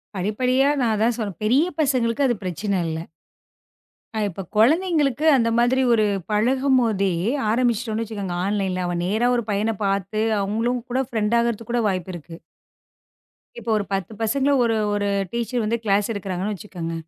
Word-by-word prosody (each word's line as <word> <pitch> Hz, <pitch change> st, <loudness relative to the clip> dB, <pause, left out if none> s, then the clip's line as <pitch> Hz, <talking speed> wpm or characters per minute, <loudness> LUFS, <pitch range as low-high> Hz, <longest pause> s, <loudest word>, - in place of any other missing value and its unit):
படிப்படியா? 250 Hz, +8 st, +1 dB
நான் 230 Hz, -4 st, +2 dB
அதான் 225 Hz, +3 st, +1 dB
சொல்றேன் 205 Hz, -7 st, -4 dB
பெரிய 260 Hz, +9 st, +4 dB
பசங்களுக்கு 260 Hz, -3 st, +1 dB
அது 240 Hz, -, +1 dB
பிரச்சன 185 Hz, +2 st, -2 dB
இல்ல. 160 Hz, -, -3 dB, 1.2 s
அ -, -, 0 dB
இப்ப 195 Hz, +1 st, -7 dB
கொழந்தைகளுக்கு 300 Hz, -, +2 dB
அந்த 230 Hz, -3 st, +2 dB
மாதிரி 255 Hz, +2 st, +3 dB
ஒரு 215 Hz, -2 st, +3 dB, 0.3 s
பழகும் 260 Hz, +5 st, +2 dB
போதே 200 Hz, -4 st, +1 dB, 0.4 s
ஆரம்பிச்சுட்டோன்னு 230 Hz, -1 st, 0 dB
வச்சுக்கோங்க, 200 Hz, -5 st, -5 dB
ஆன்லைன்ல. 195 Hz, -2 st, -1 dB
அவன் 175 Hz, 0 st, -2 dB
நேரா 220 Hz, +6 st, +1 dB
ஒரு 235 Hz, -, 0 dB
பையன 210 Hz, +3 st, 0 dB
பாத்து, 195 Hz, +1 st, -1 dB, 0.2 s
அவுங்களும் 230 Hz, +5 st, -1 dB
கூட 260 Hz, +2 st, +1 dB
ஃப்ரெண்ட் 220 Hz, 0 st, 0 dB
ஆகுறதுக்கு 235 Hz, -1 st, -2 dB
கூட 240 Hz, -1 st, +1 dB
வாய்ப்பு 185 Hz, -2 st, -2 dB
இருக்கு. 165 Hz, 0 st, -10 dB, 1.2 s
இப்போ 230 Hz, 0 st, -7 dB
ஒரு 205 Hz, -, -2 dB
10 195 Hz, +1 st, -2 dB
பசங்கள 270 Hz, +5 st, +1 dB
ஒரு 230 Hz, -1 st, +1 dB, 0.2 s
ஒரு 205 Hz, 0 st, 0 dB, 0.2 s
டீச்சர் 235 Hz, 0 st, -2 dB
வந்து 225 Hz, +2 st, 0 dB
க்ளாஸ் 205 Hz, -1 st, +2 dB
எடுக்குறாங்கன்னு 195 Hz, -1 st, -3 dB
வச்சுக்கங்க. 175 Hz, -4 st, -6 dB
220 Hz, 150 wpm, -22 LUFS, 200-240 Hz, 1.2 s, பெரிய